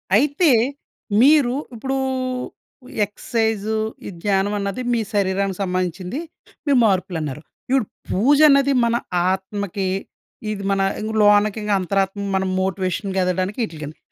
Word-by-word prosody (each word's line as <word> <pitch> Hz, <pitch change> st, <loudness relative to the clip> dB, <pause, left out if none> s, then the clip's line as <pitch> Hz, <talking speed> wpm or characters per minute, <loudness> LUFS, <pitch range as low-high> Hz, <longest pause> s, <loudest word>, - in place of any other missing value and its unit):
అయితే 290 Hz, -, +3 dB, 0.7 s
మీరు 275 Hz, -3 st, +5 dB, 0.2 s
ఇప్పుడూ 265 Hz, +4 st, -2 dB, 1.1 s
ఎక్సర్సైజ్, 220 Hz, 0 st, -2 dB, 0.4 s
ఈ -, -, -4 dB
ధ్యానం 200 Hz, 0 st, +1 dB
అన్నది 200 Hz, +5 st, -3 dB
మీ 235 Hz, -, +2 dB
శరీరానికి 195 Hz, -1 st, 0 dB
సంబంధించింది, 185 Hz, -, -2 dB, 0.5 s
మీ 285 Hz, -, +3 dB
మార్పులు 185 Hz, -3 st, +1 dB
అన్నారు. 150 Hz, -1 st, -5 dB, 0.3 s
ఇపుడు 265 Hz, -4 st, +2 dB, 0.2 s
పూజ 265 Hz, +10 st, +3 dB
అన్నది 275 Hz, 0 st, +4 dB
మన 235 Hz, -, +1 dB, 0.4 s
ఆత్మకి, 190 Hz, 0 st, -3 dB, 0.6 s
ఇది 200 Hz, -2 st, -5 dB
మన 195 Hz, -, +1 dB, 0.2 s
ఇంగ 215 Hz, +1 st, -3 dB
లోనకి 205 Hz, +1 st, +4 dB
ఇంగ 210 Hz, -, -2 dB
అంతరాత్మ 195 Hz, +2 st, -1 dB
మనం 190 Hz, 0 st, 0 dB
మోటివేషన్‌గెదగడానికి 190 Hz, +1 st, -1 dB
ఇటికండి. 155 Hz, -5 st, -9 dB
200 Hz, 115 wpm, -21 LUFS, 190-225 Hz, 1.1 s, మీరు